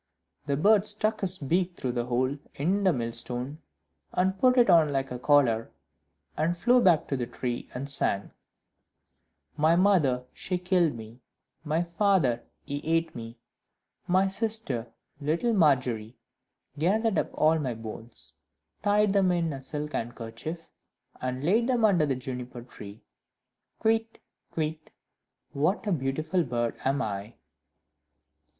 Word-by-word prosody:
The 140 -1 +1
bird 205 +5 +4
stuck 215 +1 -1
his 185 -4 0
neck 175 +5 0
through 130 - -2
the 120 -1 -2
hole 130 +3 +1 0.2
in 185 +8 0
the 190 - +5
millstone, 125 +2 -3 0.5
and 190 +1 +1
put 255 0 +4
it 240 - +6
on 165 -5 +5
like 135 -1 -1
a 125 - -4
collar, 125 -5 +3 0.7
and 170 +3 0
flew 245 +7 +4
back 175 -7 +4
to 140 - 0
the 125 -2 -2
tree, 120 0 -4
and 135 +3 -4
sang 120 -8 0 1.3
"My 155 +2 +4
mother, 170 -10 +3
she 180 - -2
killed 180 -5 +2
me; 115 +2 -11 0.4
My 160 +2 0
father, 170 - +2 0.2
he 145 0 -3
ate 165 +1 +1
me; 115 0 -8 0.7
My 185 +2 +3
sister, 195 - -1 0.3
little 165 +11 0
Margery, 125 - +2 0.6
Gathered 210 +6 +2
up - - -1
all 160 +1 +3
my 130 -5 -2
bones, 115 +1 -8 0.5
Tied 205 0 +3
them 195 -2 +3
in 170 -3 0
a 135 - -7
silk 150 +2 -5
handkerchief, 120 +8 -5 0.5
And 130 +1 -3
laid 220 +9 +3
them 245 -4 +3
under 175 -8 +3
the 135 - +1
Juniper 125 -1 -6
tree: 105 -3 -12 0.8
Kywitt! 225 0 +1 0.3
Kywitt! 155 -1 -3 0.6
what 180 +10 0
a 205 - 0
beautiful 155 +4 0
bird 120 -3 -1
am 135 +1 +1
I!" 105 +1 -5
150 Hz, 140 wpm, -28 LUFS, 125-185 Hz, 1.3 s, it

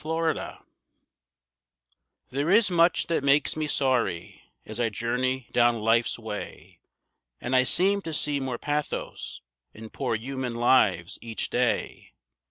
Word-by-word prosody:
=Sorry= 160 +1 -2 1.7
There 140 +5 -1
is 205 +1 +4
much 170 0 +3
that 165 -4 -1
makes 140 -1 +3
me 155 -1 -2
sorry 130 - -1 0.2
as 110 +2 -6
I 115 -1 +1
journey 125 +4 -2
down 120 -1 +3
life's 115 +2 +1
way. 110 -3 -8 0.6
And 125 +2 -2
I 130 - +6
seem 195 +9 +3
to 165 - -6
see 145 -1 0
more 130 -3 -3
pathos 145 - -4 0.3
in 110 0 -10
poor 130 -5 -2
human 130 +1 -4
lives 95 -7 +2
each 115 -3 -4
day. - - -1
130 Hz, 130 wpm, -26 LUFS, 115-150 Hz, 1.7 s, I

